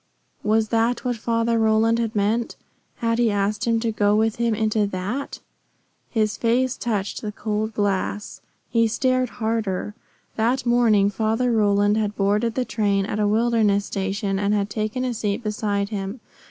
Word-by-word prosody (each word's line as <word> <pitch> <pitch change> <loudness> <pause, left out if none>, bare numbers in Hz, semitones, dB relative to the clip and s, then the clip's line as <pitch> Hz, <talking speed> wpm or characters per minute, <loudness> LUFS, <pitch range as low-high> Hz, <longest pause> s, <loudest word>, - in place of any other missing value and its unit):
Was 215 0 +1
that 230 +2 +1
what 245 -1 0
Father 230 0 0
Roland 220 +1 +3
had 230 -1 -2
meant? 215 +3 0 0.4
Had 230 0 -1
he 235 -2 +3
asked 205 +2 0
him 230 -1 +2
to 230 -1 0
go 205 -1 +2
with 220 0 +1
him 235 -1 +1
into 215 -1 +1
that? 200 +9 -4 0.7
His 215 -3 0
face 245 +2 +1
touched 210 -4 -3
the 210 - -4
cold 215 +1 -3
glass. 205 0 -2 0.3
He 230 -1 +3
stared 255 +2 +1
harder. 220 -3 -2 0.4
That 245 +4 +1
morning 225 -4 +3
Father 225 +4 0
Roland 205 -1 +3
had 210 -1 -1
boarded 210 +3 +1
the 255 - 0
train 200 -4 0
at 210 +1 -3
a 210 - +2
wilderness 215 -2 +2
station 195 0 -2
and 205 +1 +1
had 200 0 -1
taken 215 +5 -2
a 250 - -1
seat 210 0 -2
beside 205 -2 -1
him. 200 +2 -4
220 Hz, 165 wpm, -23 LUFS, 205-230 Hz, 0.7 s, Roland